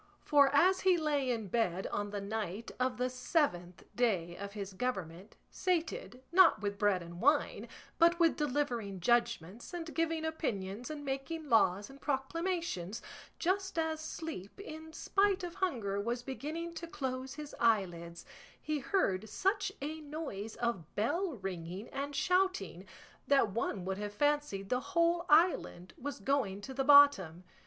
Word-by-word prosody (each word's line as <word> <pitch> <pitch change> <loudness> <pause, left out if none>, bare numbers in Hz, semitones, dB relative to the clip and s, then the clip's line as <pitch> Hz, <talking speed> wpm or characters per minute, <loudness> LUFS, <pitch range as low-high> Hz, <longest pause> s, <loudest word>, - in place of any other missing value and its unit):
For 285 -2 +5
as 365 +7 +5
he 370 -2 +4
lay 295 -4 0
in 225 -4 -1
bed 190 -4 0
on 205 0 -2
the 205 0 -4
night 210 0 -4
of 255 0 0
the 250 +1 +1
seventh 250 - -1
day 185 -8 +1
of 200 +2 -7
his 200 -2 -6
government, 190 -5 -4 0.2
sated, 320 - -2
not 370 0 +6
with 200 -1 -3
bread 205 -4 +2
and 170 +2 -9
wine, 290 +4 +2 0.3
but 340 +1 +5
with 335 -2 +4
delivering 250 -9 -1
judgments 235 - 0
and 330 -2 -5
giving 330 -1 0
opinions 230 - -3
and 295 -2 -6
making 275 +3 -4
laws 205 -3 +3
and 275 0 -14
proclamations, 285 - -2 0.3
just 380 +1 -1
as 320 -1 0
sleep, 315 - -6
in 320 -5 -8
spite 395 +3 +1
of 350 -1 -4
hunger, 225 - -1
was 235 +3 -2
beginning 310 +6 -5
to 335 0 -6
close 260 -3 -4
his 300 -1 -8
eyelids, 175 -7 0 0.3
he 305 -1 -2
heard 220 - 0
such 395 - 0
a 310 +2 -4
noise 285 -9 -6
of 230 -9 -3
bell 335 - 0
ringing 190 -1 -6
and 280 +1 -4
shouting 315 - 0 0.4
that 270 -7 +4
one 195 -3 -2
would 190 +1 -2
have 205 0 -4
fancied 290 -9 0
the 250 - +2
whole 340 +2 +1
island 300 - +3
was 285 -1 -6
going 205 -4 0
to 265 +6 -8
the 270 +1 0
bottom. 265 - +6
260 Hz, 150 wpm, -33 LUFS, 200-320 Hz, 0.4 s, not